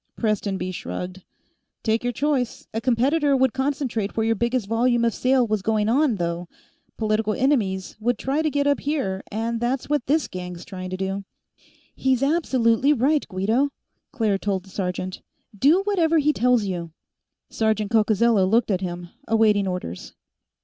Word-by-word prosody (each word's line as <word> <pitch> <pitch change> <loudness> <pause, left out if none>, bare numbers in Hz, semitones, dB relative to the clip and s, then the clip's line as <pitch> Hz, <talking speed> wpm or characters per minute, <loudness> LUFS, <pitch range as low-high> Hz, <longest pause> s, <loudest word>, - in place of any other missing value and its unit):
Prestonby 200 -4 -1
shrugged. 180 +1 -6 0.6
"Take 225 +1 +1
your 245 - 0
choice. 260 -1 -1
A 225 - -2
competitor 275 +4 +2
would 260 -2 +2
concentrate 265 -7 -2
where 220 - +2
your 225 - +3
biggest 235 +1 0
volume 235 +2 +2
of 230 - +1
sale 255 -1 +2
was 215 -2 -1
going 215 0 +1
on, 260 +1 +3
though; 170 -1 -3 0.5
political 215 -1 0
enemies 220 -9 0
would 240 +1 0
try 275 +6 -1
to 315 - +1
get 285 -1 0
up 285 0 +2
here, 265 -11 -2
and 225 +2 -2
that's 250 +3 -1
what 295 -4 0
this 300 +2 +2
gang's 180 -1 -7
trying 185 -1 -7
to 185 - -4
do." 195 +1 -3 0.7
"He's 265 -1 +1
absolutely 275 -4 +2
right, 285 +3 +1
Guido," 220 +8 +1 0.4
Claire 220 -8 0
told 195 -2 -1
the 190 - -17
sergeant. 185 -1 -3 0.3
"Do 290 - +4
whatever 340 -5 +2
he 300 0 +3
tells 250 -3 +3
you." 170 -4 -4 0.6
Sergeant 220 -1 0
Coccozello 220 -2 +3
looked 225 +1 +2
at 185 -1 0
him, 175 -1 -5 0.2
awaiting 215 -3 +3
orders. 180 - -5
225 Hz, 160 wpm, -23 LUFS, 195-265 Hz, 0.7 s, Do